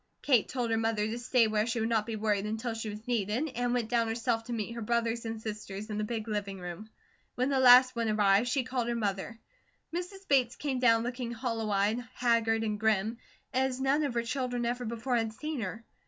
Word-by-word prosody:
Kate 250 -7 +3
told 245 -3 -2
her 225 - +2
mother 225 -2 0
to 225 +3 -3
stay 240 -1 +3
where 215 0 +1
she 235 0 -1
would 220 - 0
not 225 -2 +1
be 225 - -3
worried 210 -1 0
until 225 +2 -3
she 225 -1 -4
was 210 +2 -8
needed, 235 +5 0
and 245 0 -1
went 240 -2 0
down 230 0 +1
herself 225 0 -1
to 245 - -7
meet 230 -1 -3
her 235 - -6
brothers 235 +1 0
and 225 0 -4
sisters 215 -1 -6
in 210 - -2
the - - 0
big 220 0 -3
living 200 -2 -3
room. 180 +4 -7 0.5
When 255 +2 +1
the 275 -1 +2
last 255 0 +8
one 230 -1 0
arrived, 205 +1 +3
she 255 +1 +1
called 250 -2 -2
her 240 - -1
mother. 205 0 -2 0.6
Mrs. 370 +3 -5
Bates 255 -3 +3
came 275 -3 -2
down 230 -2 +4
looking 245 0 -4
hollow 230 -3 -2
eyed, 205 +3 +2 0.2
haggard, 230 -2 +2
and 210 -1 -2
grim, 220 +1 +1 0.3
as 260 0 0
none 270 +3 +2
of 275 -5 -2
her 235 - +1
children 245 0 -2
ever 245 +1 -2
before 235 +2 -1
had 225 -1 -1
seen 305 +2 -4
her. 220 +3 -5
230 Hz, 225 wpm, -30 LUFS, 215-245 Hz, 0.6 s, last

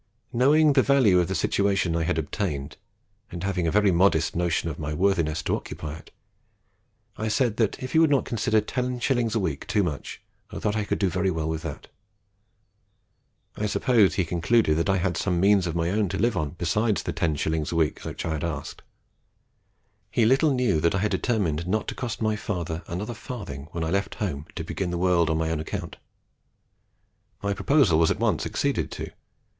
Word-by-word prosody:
Knowing 145 +5 +4
the 135 - +5
value 125 -10 +4
of 90 - +1
the 95 - -2
situation 95 0 +1
I 85 - 0
had 80 -1 0
obtained, 75 -3 -3 0.6
and 85 0 -6
having 90 -3 0
a - - +1
very 105 -1 +4
modest 85 -3 +2
notion 85 -1 0
of 80 - -5
my 75 -1 -3
worthiness 80 -4 +1
to - - +1
occupy 75 -1 -6
it, - - -17 1.1
I 110 - -2
said, 110 0 +1
that 110 +2 0
if 130 - -5
he 160 - +4
would 160 -2 +5
not 140 -2 +2
consider 110 -2 +1
10s. 125 -1 -1
a - - +2
week 80 -8 -3
too 105 -2 +2
much, 75 -6 -4 0.3
I - - -8
thought 105 0 -1
I 105 -2 -1
could - - -1
do 100 - +1
very 95 +2 0
well 80 -3 -2
with 80 0 -2
that. 80 -4 -7 1.7
I 105 - -1
suppose 110 -2 +3
he 95 - +1
concluded 85 +1 +2
that 85 +4 0
I 95 - +3
had 90 -1 -1
some 90 -2 0
means 100 -1 +4
of 85 - -3
my 85 +1 0
own 105 -1 +1
to 95 - -3
live 120 +2 +1
on 75 +1 -2
besides 105 +6 0
the - - -3
10s. 80 -2 -1
a - - -2
week 80 -2 +1
which - - -6
I 80 -1 -1
asked. 85 +1 -5 1.3
He 115 - +2
little 135 +6 +4
knew 125 -11 +2
that 85 +3 +2
I - - +2
had 105 +2 0
determined 90 - 0
not 105 +4 -1
to - - -4
cost 120 -3 -4
my 110 0 +1
father 85 -6 -4
another 100 +7 -4
farthing 100 - -7
when 85 -1 -3
I 80 - -2
left 100 +1 -1
home 80 -8 -4
to - - -4
begin 95 -2 -3
the 85 - -2
world 85 -2 +2
on 80 - +1
my 80 0 -1
own 80 - -1
account. 75 - -5 1.5
My 100 0 0
proposal 110 - +3
was 80 - +4
at - - -1
once - - +1
acceded - - -1
to. - - -6
95 Hz, 200 wpm, -25 LUFS, 80-110 Hz, 1.7 s, the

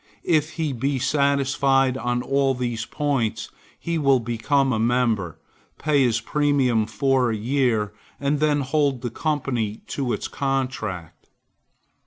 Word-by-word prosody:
If 160 -2 +1
he 160 -4 -2
be 135 +3 -1
satisfied 135 -1 +2
on 120 -1 -1
all 135 -1 +1
these 120 -3 -3
points, 140 -7 -1 0.3
he 170 -1 -2
will 135 -3 +4
become 125 +4 0
a 110 - 0
member, 115 -7 +1 0.4
pay 150 -2 +2
his 120 -4 +2
premium 130 -4 +1
for 130 +3 +1
a 110 - -1
year, 115 -3 0 0.3
and 140 +1 0
then 150 -1 +2
hold 140 -2 0
the 120 - -3
company 125 -9 -2
to 135 -4 -2
its - - -2
contract. 130 - -3
130 Hz, 135 wpm, -23 LUFS, 115-140 Hz, 0.4 s, will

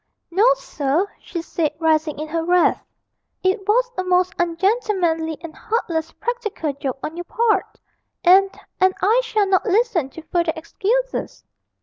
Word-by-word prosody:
'No, 390 +6 +3
sir,' 330 - -1
she 340 -3 -6
said, 310 -3 -1
rising 315 -2 +1
in 305 +1 -4
her 325 +1 -2
wrath; 355 +1 +3 0.6
'it 380 +1 0
was 485 +3 +3
a - - 0
most 365 0 +2
ungentlemanly 345 -3 0
and 335 -2 -9
heartless 335 -8 -2
practical 425 - -3
joke 270 -1 -4
on 310 - -4
your 350 +1 -6
part, 435 -1 0 0.5
and 385 +2 +6 0.3
and 375 0 +4
I 445 +6 +4
shall 425 -4 +1
not 385 -1 +2
listen 395 - +2
to 320 +4 -11
further 340 -1 0
excuses.' 470 +10 -2
360 Hz, 145 wpm, -21 LUFS, 325-425 Hz, 0.6 s, and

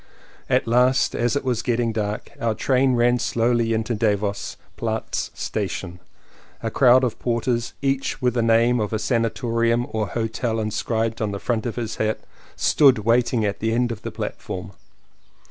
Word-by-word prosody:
At - - +2
last, 125 +3 +3
as 120 +3 +1
it 145 - -1
was 125 -3 0
getting 120 -1 0
dark, 105 -1 -3
our 115 -2 0
train 130 +1 +2
ran 120 +1 +3
slowly 120 -1 +1
into 110 +1 0
Davos 105 -2 -1 0.2
Platz - - -2
station. 95 -3 -4 0.6
A 115 - -2
crowd 130 +1 +5
of 125 - -1
porters, 120 0 -1
each 135 0 0
with 125 -1 +1
a 120 - +2
name 115 +2 +3
of 105 0 -2
a - - +2
sanatorium 115 0 0
or 110 -2 -1
hotel 115 +2 -2
inscribed 110 +1 -1
on 110 - 0
the 100 0 -4
front 115 0 -1
of 115 - -4
his 115 -2 -4
hat, 110 0 0 0.4
stood 140 -5 +5
waiting 115 +1 +2
at 100 -1 -2
the 110 +1 0
end 120 0 +1
of 110 -2 -6
the - - -4
platform. 90 0 -6
115 Hz, 165 wpm, -23 LUFS, 110-120 Hz, 0.6 s, crowd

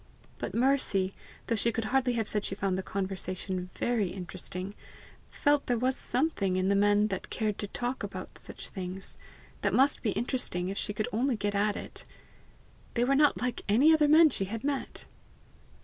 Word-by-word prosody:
But - - -4
Mercy, 230 -7 +2 0.3
though 230 - 0
she 230 +2 +1
could 230 0 -2
hardly 260 -2 +3
have 225 -3 -1
said 210 -1 0
she 195 - -3
found 195 -2 0
the 190 - -1
conversation 185 -1 -3
VERY 230 -5 +1
interesting, 185 +1 -5 0.6
felt 290 -1 +1
there 245 - +2
was 255 +3 +1
something 245 - 0
in 185 +1 +1
the 200 - +3
men 205 +1 +4
that 190 -2 -4
cared 215 -2 -1
to 205 - -2
talk 245 +5 -3
about - - -6
such - - -6
things, 190 0 -5 0.4
that - - +1
must 275 +2 +4
be 225 - 0
interesting 215 -6 -1
if 195 - -4
she 210 - -1
could 210 +1 -2
only 250 +3 +1
get 205 -1 -1
at 205 +1 +1
it. - - -6 0.9
They 240 - +3
were 265 +3 +3
not 290 +1 +4
like 250 -1 -1
any 270 +10 +6
other 305 -2 +4
men 310 +1 +7
she 195 - 0
had 220 +3 -5
met! 280 -1 -3
215 Hz, 185 wpm, -29 LUFS, 195-255 Hz, 0.9 s, men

